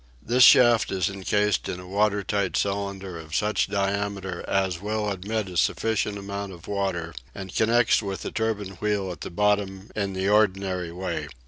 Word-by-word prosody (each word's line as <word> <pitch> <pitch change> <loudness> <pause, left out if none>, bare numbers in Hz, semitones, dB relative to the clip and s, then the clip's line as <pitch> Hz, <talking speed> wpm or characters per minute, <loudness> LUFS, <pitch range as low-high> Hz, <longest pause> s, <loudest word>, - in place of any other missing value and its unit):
This 120 - +1
shaft 120 -2 +7
is 95 -2 0
incased 100 +1 0
in 90 - -4
a 90 - -10
water 105 +1 +1
tight 100 -2 -1
cylinder 100 -3 -2
of 80 0 -7
such 105 0 +1
diameter 100 -2 -2
as 95 -3 0
will 105 0 -1
admit 100 +2 -3
a 90 - -8
sufficient 105 +2 +1
amount 100 0 -5
of 85 -2 -13
water, 95 -5 -2 0.2
and 95 -1 -7
connects 115 +1 +3
with 100 -2 -5
the - - -4
turbine 105 -5 -2
wheel 105 -3 0
at 90 - -9
the - - -5
bottom 100 0 0
in 100 -2 -1
the 95 +1 -1
ordinary 95 -4 +1
way. 90 +2 -4
100 Hz, 175 wpm, -25 LUFS, 95-105 Hz, 0.2 s, shaft